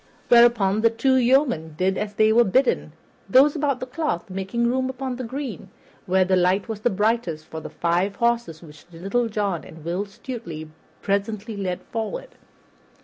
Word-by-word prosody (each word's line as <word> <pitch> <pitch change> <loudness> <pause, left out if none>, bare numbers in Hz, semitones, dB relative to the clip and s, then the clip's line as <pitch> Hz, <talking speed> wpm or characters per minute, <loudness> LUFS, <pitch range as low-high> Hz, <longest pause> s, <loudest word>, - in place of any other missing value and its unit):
Whereupon 235 -4 +5
the 230 - +5
two 230 +4 +1
yeomen 245 - +2
did 190 +2 +1
as 210 +1 -4
they 215 +1 +4
were 240 +1 +6
bidden, 235 - +1 0.4
those 275 - +5
about 285 -4 0
the 255 - -4
cloth 255 - -3
making 195 +6 -2
room 260 +1 0
on 260 -2 -3
the 255 - -5
green, 245 - -6 0.4
where 185 0 +3
the 185 0 +2
light 185 +3 +2
was 220 -2 -5
brightest, 210 -7 0
for 160 - -7
the - - -8
five 175 +4 0
horses 235 -9 -1
which 150 -1 -15
Little 195 +8 -1
John 200 -5 -2
and 160 -1 -13
Will 180 +4 -2
Stutely 195 -8 -8 0.3
presently 205 +2 -2
led 185 -3 -3
forward. - - -5
210 Hz, 165 wpm, -23 LUFS, 185-240 Hz, 0.4 s, were